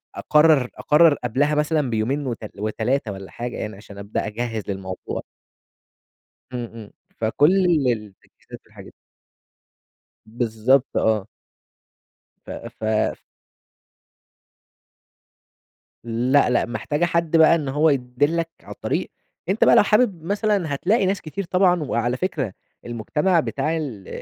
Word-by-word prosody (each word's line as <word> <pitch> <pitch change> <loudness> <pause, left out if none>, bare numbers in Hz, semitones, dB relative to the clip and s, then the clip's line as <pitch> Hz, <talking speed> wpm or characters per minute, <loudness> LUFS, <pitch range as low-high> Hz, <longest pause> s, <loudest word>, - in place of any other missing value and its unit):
أقرّر 150 -4 +4
أقرّر 155 +1 +5
قبلها 140 +4 0
مثلًا 150 -2 +1
بيومين 125 +6 -1
وت 120 -3 -3 0.2
و3 110 +3 -1
والّا 95 -1 -9
حاجة 120 0 -5
يعني 105 -1 -5
عشان 100 0 -13
أبدأ 100 +1 -3
أجهّز 115 0 -3
للموضوع. 95 -2 -5 1.3
إمم، 120 -1 -3
إمم. 110 -3 -10 0.3
فكل 150 - +3 0.2
التجهيزات 105 -5 -6
والحاجات - - -14
دي. - - -14 1.3
بالضبط 120 +3 +1
آه. 110 -2 +1 1.2
ف - - -15
ف 110 0 -2 2.8
لأ، 125 +5 +2
لأ 125 - +2
محتاجة 145 +8 -1
حد 170 -1 +1
بقى 160 +1 +6
إن 150 -5 -3
هو 150 +4 +3
يدلّك 145 +5 0
عالطريق. - - -4 0.4
أنت 200 +4 +2
بقى - - +6
لو - - +7
حابب 210 -5 +2
مثلًا 200 -3 0
هتلاقي 195 - +1
ناس 190 0 0
كتير 180 +6 -5
طبعًا، 180 -2 +2
وعلى 120 -2 -1
فكرة 145 - -2 0.3
المجتمع 150 - 0
بتاع 155 +1 -1
ال 120 - -6
135 Hz, 115 wpm, -22 LUFS, 110-165 Hz, 2.8 s, لو